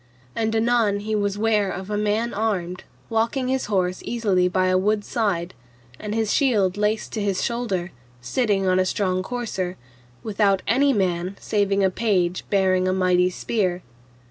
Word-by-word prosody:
And 225 0 0
anon 225 -3 +2
he 215 +1 -3
was 205 -1 0
ware 210 -2 +2
of 190 +2 -6
a - - 0
man 210 +3 0
armed, 190 -4 -2 0.2
walking 230 +3 0
his 265 0 0
horse 185 -3 0
easily 200 -6 +1
by 185 +1 +1
a 185 - +2
wood's 205 +2 0
side, 190 -7 -1 0.5
and 210 0 -4
his 220 -2 0
shield 210 -10 +2
laced 210 +1 -1
to 220 - -2
his 200 -2 0
shoulder, 200 -7 -2 0.3
sitting 200 - 0
on 185 0 +3
a 185 - +2
strong 185 -2 0
courser, 190 -5 -4 0.5
without 200 -2 +1
any 275 +6 +3
man 185 -3 -1
saving 200 -1 +1
a 190 - +3
page 185 -5 0
bearing 185 -2 +2
a 185 - +2
mighty 180 -1 +3
spear. 185 -2 -2
200 Hz, 165 wpm, -23 LUFS, 185-220 Hz, 0.5 s, on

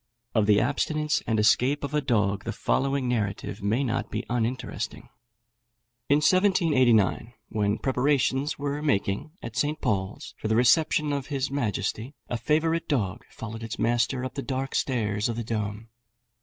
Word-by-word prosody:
Of 110 -3 +2
the 105 -1 +5
abstinence 150 +4 0
and 110 -2 +1
escape 125 +7 +3
of 140 0 -4
a 150 - +2
dog, 105 -7 +1
the - - -3
following 135 -1 0
narrative 105 -7 -2
may 110 +7 +1
not 130 0 -2
be - - -3
uninteresting: 120 +1 -3 1.0
In 145 - +6
1789, 135 - +3
when 105 -1 0
preparations 135 +2 +1
were 145 +1 -3
making 145 +1 0
at 115 -1 -7
St. 150 +2 0
Paul's 95 -1 -2
for - - -3
the 110 - +2
reception 145 +5 +3
of 140 -2 -3
his 135 -2 -2
majesty, 115 0 -2
a 120 - -1
favourite 160 +6 +1
dog 110 - -1
followed 115 0 -7
its 115 -1 -5
master 120 +2 +1
up 130 - -5
the 140 - -4
dark 135 0 -3
stairs 105 -4 0
of 115 - -2
the 115 - -3
dome. 110 0 -4
125 Hz, 155 wpm, -26 LUFS, 110-140 Hz, 1.0 s, In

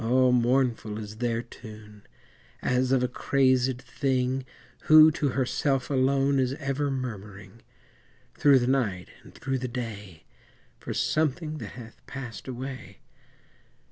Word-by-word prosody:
mournful 120 -3 +1
is 105 0 -7
their 120 0 -1
tune, 105 -3 -13 0.6
As 125 0 +1
of 130 -2 +3
a - - +2
crazèd 130 0 +1
thing 130 -1 -1 0.4
Who, 155 0 +8
to 150 -2 -1
herself 135 +1 0
alone, 135 +1 +2
Is 130 0 +1
ever 140 0 -2
murmuring, 105 -5 -6 0.7
Through 140 -2 +5
the 120 - +1
night 115 -9 0
and - - -15
through 135 -1 -2
the 130 - -3
day, 105 - -7 0.6
For - - -7
something 155 0 0
that - - -8
hath 115 -2 -12
passed 130 -4 -8
away. 130 +1 -7
130 Hz, 125 wpm, -27 LUFS, 115-135 Hz, 0.7 s, Who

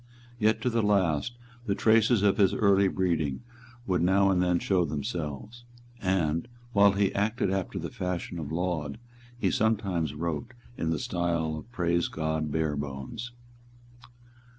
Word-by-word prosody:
Yet 110 +1 +2
to 125 - +1
the 115 0 +1
last 100 +1 +1 0.3
the 100 - +1
traces 110 0 +4
of 100 -1 +3
his 95 -2 +4
early 100 -2 +4
breeding 85 - -1 0.4
would 90 -3 +1
now 95 +2 +4
and 90 -1 +2
then 90 -1 +2
show 90 +1 +1
themselves; 75 - -4 0.4
and, 85 -1 0 0.3
while 100 -1 +6
he 100 0 +1
acted 105 -1 0
after 95 0 -2
the 85 -2 -4
fashion 90 -5 -4
of 75 -2 -5
Laud, 80 -4 -2 0.4
he 100 -7 +1
sometimes 100 -8 0
wrote 85 - -4 0.2
in 80 - -2
the 80 - +1
style 85 -1 -1
of 95 +10 -9
Praise 85 -5 +1
God 80 -1 -2
Barebones. 75 - -3
90 Hz, 145 wpm, -28 LUFS, 80-100 Hz, 0.4 s, while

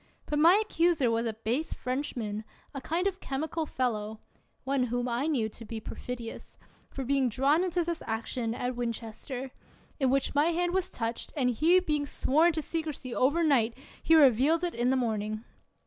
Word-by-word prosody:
But 295 - -1
my 340 +6 +7
accuser 330 - +2
was 230 +1 0
a 225 - -2
base 230 +8 -2
Frenchman, 245 -5 -3 0.3
a 275 - -5
kind 335 +7 -1
of 385 -1 -1
chemical 315 +3 -3
fellow 220 -5 -2 0.2
— - - -42
one 265 -1 +1
whom 245 +1 -2
I 245 +5 0
knew 255 -9 +1
to 230 - -11
be 225 0 -6
perfidious; 240 +1 -7 0.3
for 270 - -5
being 270 -1 +2
drawn 280 +8 +2
into 355 -1 0
this 340 0 -3
action 225 +1 -2
at 250 +1 -2
Winchester, 240 +2 -5 0.5
in 265 -2 +2
which 270 +1 +1
my 290 +1 +3
hand 345 +1 +1
was 380 -1 0
touched, 230 0 -4
and 250 -3 +2
he 325 +9 +4
being 300 -5 -1
sworn 315 +6 +3
to 315 -1 -2
secrecy 305 -7 -4
overnight, 270 -5 +2 0.2
he 325 - +4
revealed 290 +3 +5
it 350 - 0
in 240 +1 +1
the 265 - +3
morning. 215 -2 -2
265 Hz, 180 wpm, -29 LUFS, 235-315 Hz, 0.5 s, my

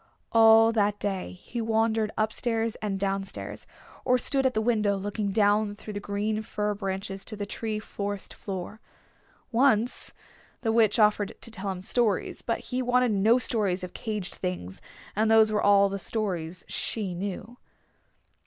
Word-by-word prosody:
All 225 0 +7
that 205 -2 +1
day 195 -2 -3
he 230 +6 -6
wandered 220 -1 +1
up 220 0 +1
stairs 225 -2 -1
and 200 -3 -2
down 195 0 0
stairs, 195 - -8 0.4
or 250 -1 +3
stood 270 +1 +2
at 255 - -3
the - - +2
window 215 -3 +1
looking 205 +1 -2
down 205 0 +2
through 210 0 -9
the 205 - -3
green 205 +2 -2
fir 210 -1 -2
branches 195 -1 -3
to 215 - -4
the 205 -1 -4
free 215 +1 -3
forest 205 -1 -5
floor. 195 +2 -6 0.7
Once 240 -1 +3 0.5
the 225 - +1
Witch 220 -1 +4
offered 210 -2 +2
to 230 - -8
tell 200 -2 -4
him 185 -1 -5
stories. 225 0 0
But - - -2
he 255 0 -3
wanted 250 -1 +2
no 215 +4 +4
stories 205 -8 0
of 180 - -6
caged 210 -5 -4
things, 95 - -5 0.3
and 215 +2 +2
those 220 -1 +6
were 210 - +1
all 200 0 +5
the 195 0 -4
stories 185 -6 -3
she 205 -5 -2
knew. 200 +6 -5
210 Hz, 165 wpm, -27 LUFS, 195-225 Hz, 0.7 s, All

